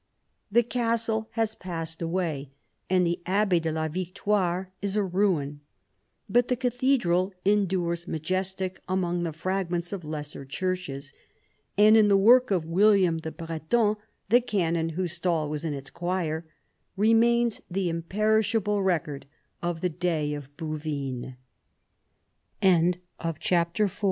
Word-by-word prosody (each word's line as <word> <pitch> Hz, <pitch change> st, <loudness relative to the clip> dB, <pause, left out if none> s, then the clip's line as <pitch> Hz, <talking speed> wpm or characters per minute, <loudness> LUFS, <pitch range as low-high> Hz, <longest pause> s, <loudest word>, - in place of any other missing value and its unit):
The 235 Hz, +3 st, +5 dB
castle 230 Hz, -2 st, -1 dB
has 225 Hz, -1 st, 0 dB
passed 165 Hz, -4 st, -5 dB
away, 165 Hz, -5 st, -2 dB, 0.4 s
and 185 Hz, -1 st, +3 dB
the 170 Hz, +1 st, -1 dB
abbaye 190 Hz, -2 st, +2 dB
de 160 Hz, 0 st, -1 dB
la 160 Hz, 0 st, -1 dB
Victoire 185 Hz, +2 st, -1 dB
is 200 Hz, 0 st, -2 dB
a 210 Hz, -, +2 dB
ruin, 180 Hz, -7 st, 0 dB, 0.7 s
but 245 Hz, +4 st, +3 dB
the 250 Hz, -, +1 dB
cathedral 240 Hz, -7 st, +1 dB
endures 185 Hz, -4 st, +1 dB
majestic 185 Hz, +3 st, -2 dB
amid 175 Hz, -2 st, 0 dB
the -, -, -3 dB
fragments 175 Hz, +1 st, -2 dB
of 190 Hz, -3 st, -5 dB
lesser 150 Hz, -2 st, -5 dB
churches; 140 Hz, -2 st, -4 dB, 0.6 s
and 215 Hz, +1 st, +7 dB
in 215 Hz, -2 st, +6 dB
the 200 Hz, -1 st, +5 dB
work 245 Hz, +6 st, +6 dB
of 180 Hz, -5 st, +1 dB
William 185 Hz, -1 st, +4 dB
the 160 Hz, 0 st, -5 dB
Breton, 165 Hz, +7 st, 0 dB, 0.3 s
the 240 Hz, +3 st, +6 dB
canon 170 Hz, -8 st, 0 dB
whose 180 Hz, -3 st, -1 dB
stall 170 Hz, -2 st, 0 dB
was 150 Hz, +1 st, -4 dB
in 155 Hz, -3 st, -2 dB
its 135 Hz, -1 st, -8 dB
choir, 170 Hz, -2 st, -2 dB, 0.5 s
remains 230 Hz, +2 st, +3 dB
the 185 Hz, 0 st, -1 dB
imperishable 210 Hz, +4 st, +1 dB
185 Hz, 110 wpm, -27 LUFS, 165-210 Hz, 0.7 s, and